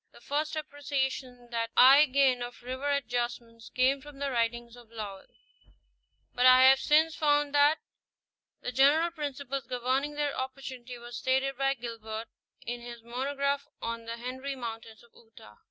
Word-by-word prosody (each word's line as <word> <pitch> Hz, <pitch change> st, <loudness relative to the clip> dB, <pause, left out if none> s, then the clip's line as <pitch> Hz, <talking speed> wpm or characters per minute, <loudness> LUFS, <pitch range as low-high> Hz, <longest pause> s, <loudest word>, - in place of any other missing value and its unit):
The -, -, -15 dB
first 300 Hz, +5 st, -2 dB
appreciation 270 Hz, -4 st, -3 dB
that 230 Hz, -1 st, -1 dB
I 275 Hz, +4 st, +8 dB
gained 260 Hz, -2 st, +3 dB
of 240 Hz, 0 st, -7 dB
river 260 Hz, +3 st, -3 dB
adjustments 240 Hz, -4 st, -3 dB
came 265 Hz, +2 st, +2 dB
from 295 Hz, 0 st, -12 dB
the 280 Hz, 0 st, -2 dB
writings 235 Hz, 0 st, -1 dB
of 240 Hz, -2 st, -16 dB
Léwl; 210 Hz, -4 st, -8 dB, 1.1 s
but 250 Hz, +1 st, +4 dB
I 255 Hz, 0 st, +8 dB
have 265 Hz, +1 st, +7 dB
since 310 Hz, +3 st, +3 dB
found 290 Hz, -1 st, +2 dB
that 290 Hz, +2 st, +5 dB, 0.8 s
the 250 Hz, -, -4 dB
general 290 Hz, +7 st, +4 dB
principles 280 Hz, -4 st, -5 dB
governing 260 Hz, +4 st, -1 dB
their 290 Hz, -1 st, -1 dB
opportunity 260 Hz, -2 st, -6 dB
were 240 Hz, 0 st, -11 dB
stated 265 Hz, +3 st, 0 dB
by 270 Hz, +1 st, +1 dB
Gilbert 230 Hz, -2 st, -7 dB, 0.4 s
in 240 Hz, 0 st, -4 dB
his 235 Hz, -1 st, -9 dB
monograph 280 Hz, +3 st, -2 dB
on 230 Hz, 0 st, -5 dB
the 230 Hz, 0 st, -5 dB
Henry 260 Hz, +3 st, -5 dB
Mountains 225 Hz, -3 st, -8 dB
of 235 Hz, -, -22 dB
Utah 220 Hz, -, -17 dB
(pp. -, -, -32 dB
255 Hz, 155 wpm, -29 LUFS, 235-280 Hz, 1.1 s, I